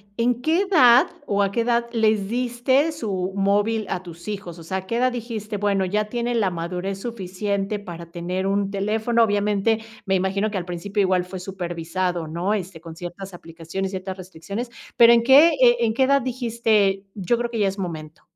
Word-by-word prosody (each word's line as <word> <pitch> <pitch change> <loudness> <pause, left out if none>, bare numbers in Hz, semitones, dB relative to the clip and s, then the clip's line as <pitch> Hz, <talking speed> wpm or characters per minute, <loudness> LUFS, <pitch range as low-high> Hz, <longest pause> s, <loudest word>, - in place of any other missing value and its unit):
¿en 240 +2 0
qué 330 +4 +2
edad 290 -7 +6 0.2
o 205 -4 0
a 195 - +1
qué 230 - 0
edad 235 0 +1
les 215 -3 +1
diste 250 +5 +1
su 195 -10 -3
móvil 205 +2 +1
a 185 - -3
tus 170 +1 -12
hijos? 195 -5 -6
O - - -10
sea, 190 +4 -3
a 190 - -6
qué 230 +4 -2
edad 255 +1 +2
dijiste: 220 -3 -5
"Bueno, 200 -1 +1
ya 210 +3 0
tiene 240 +1 -2
la 200 -5 +1
madurez 180 +3 -4
suficiente 200 -1 -3
para 170 -3 -9
tener 180 +2 -3
un 195 0 0
teléfono". 220 +4 +1
Obviamente 210 +1 +1 0.3
me 195 - 0
imagino 190 +3 0
que 205 - -2
al 175 - -6
principio 195 +4 -2
igual 185 -2 +2
fue 185 +1 -7
supervisado, 175 -1 -3
¿no? 175 +6 -1
Este, 185 -4 -4
con 165 0 -10
ciertas 180 +3 -8
aplicaciones, 170 +3 -6
ciertas 190 0 -5
restricciones, 185 +6 -6 0.3
pero 235 0 +8
¿en 235 -1 +4
qué, 280 +6 +8
eh, 240 -2 +6
en 225 -2 +1
qué 265 - +3
edad 275 +1 +3
dijiste, 225 -6 +1
yo 210 +4 0
creo 240 0 -1
que 235 - -4
ya 200 - +3
es 195 +1 -4
momento? 160 -3 -6
200 Hz, 195 wpm, -23 LUFS, 185-235 Hz, 0.3 s, pero